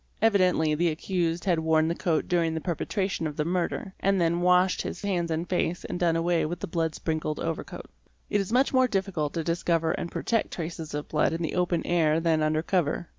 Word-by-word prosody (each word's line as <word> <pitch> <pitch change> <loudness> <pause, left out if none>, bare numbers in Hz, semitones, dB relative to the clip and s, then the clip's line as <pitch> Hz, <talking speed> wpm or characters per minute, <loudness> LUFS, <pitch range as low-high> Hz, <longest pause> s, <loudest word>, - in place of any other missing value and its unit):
Evidently 185 -7 +3
the 170 +3 +1
accused 170 +1 -2
had 175 -4 +2
worn 160 0 +2
the 165 - +1
coat 170 -2 -1
during 170 -3 +1
the - - -1
perpetration 185 +1 -2
of 150 - -7
the 150 - 0
murder, 180 +2 -2
and 195 +1 +2
had 185 - +1
then 170 +1 0
washed 180 +1 +3
his 180 - -6
hands 180 -4 -1
and 165 +2 -2
face 180 -1 -1
and 175 - -4
done 170 -2 +2
away 170 0 +1
with 170 +3 -3
the - - -3
blood 165 -2 -1
sprinkled 155 -1 -2
overcoat. 165 -1 -4 0.4
It 205 - +1
is 195 - -5
much 260 +4 +3
more 255 -1 +4
difficult 190 -9 -2
to 165 - -1
discover 165 0 0
and 170 - -3
protect 230 -2 0
traces 160 -3 -5
of 150 - -4
blood 155 - +1
in 165 +1 -2
the 160 - -2
open 180 -1 0
air 160 -2 +2
than 165 -1 +1
under 155 +1 +1
cover. 175 -2 0
170 Hz, 220 wpm, -27 LUFS, 160-180 Hz, 0.4 s, more